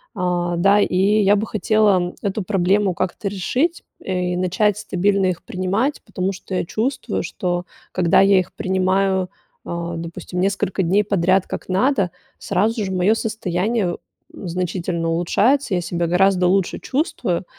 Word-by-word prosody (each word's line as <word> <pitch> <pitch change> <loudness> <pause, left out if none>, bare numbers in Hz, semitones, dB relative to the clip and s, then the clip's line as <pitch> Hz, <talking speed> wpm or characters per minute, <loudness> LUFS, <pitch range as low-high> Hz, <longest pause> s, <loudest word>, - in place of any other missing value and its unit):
А, 175 -1 -1
да, 200 +3 +4
и 180 - 0 0.2
я 200 +1 +4
бы 210 +2 0
хотела 205 -4 +2
эту 200 +1 -1
проблему 195 0 +1
как-то 190 +3 -3
решить, 255 - -1 0.2
э, 180 -1 -2
и - - -2
начать 190 +3 +1
стабильно 195 -1 +1
их 180 -2 -2
принимать, 210 +7 -1
потому 185 +1 -2
что 185 0 -7
я - - 0
чувствую, 240 +3 -2
что 175 -1 -3 0.3
когда 175 +1 +3
я 195 -1 +5
их 180 - -4
принимаю, 190 0 +1 0.4
э, 170 0 -4
допустим, 170 +2 -6
несколько 195 0 0
дней 195 +5 +3
подряд, 190 -1 +2
как - - -6
надо, 200 0 +2 0.3
сразу 210 +4 0
же 190 - -4
мое 185 +4 +3
состояние 210 -2 -1 0.4
значительно 175 -1 -3
улучшается, 205 +7 +2
я 175 - 0
себя 170 0 -2
гораздо 180 +1 +3
лучше 190 0 +1
чувствую, 245 - -2
190 Hz, 145 wpm, -21 LUFS, 180-205 Hz, 0.4 s, я